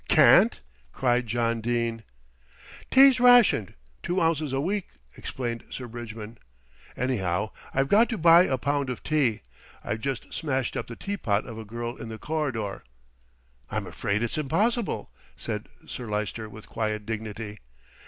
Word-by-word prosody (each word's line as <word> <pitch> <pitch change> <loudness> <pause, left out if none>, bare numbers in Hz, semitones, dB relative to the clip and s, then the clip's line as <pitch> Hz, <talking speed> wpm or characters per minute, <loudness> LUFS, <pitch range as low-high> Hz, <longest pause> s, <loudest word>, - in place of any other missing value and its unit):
"Can't!" - - +6 0.3
cried 125 -1 +1
John 115 0 0
Dene. 115 -1 -1 0.9
"Tea's 265 -1 +7
rationed 245 - +5 0.3
two 175 +2 -1
ounces 160 -4 +1
a 135 - 0
week," 190 +6 -1 0.3
explained 120 -3 -4
Sir 125 - -6
Bridgman. 115 -1 -8 0.6
"Anyhow 105 -6 -1 0.2
I've 135 +1 +1
got 220 +9 +5
to 230 - -2
buy 170 +1 +7
a 130 - 0
pound 140 +1 -1
of 125 - -5
tea. 140 -8 +1 0.4
I've 110 - -3
just 135 -1 -4
smashed 135 -5 -1
up - - -3
the 115 - -7
teapot 115 - -1
of 115 -2 -8
a 110 - -7
girl 120 +3 -5
in 115 - -7
the 110 - -6
corridor." 130 -9 -3 0.9
"I'm - - -2
afraid 100 +3 -2
it's 120 +6 -2
impossible," 210 - 0 0.3
said - - -5 0.2
Sir 125 - -7
Lyster 105 +1 -3
with 110 0 -12
quiet 110 -1 -2
dignity. 110 -1 -5
120 Hz, 145 wpm, -26 LUFS, 110-155 Hz, 0.9 s, Tea's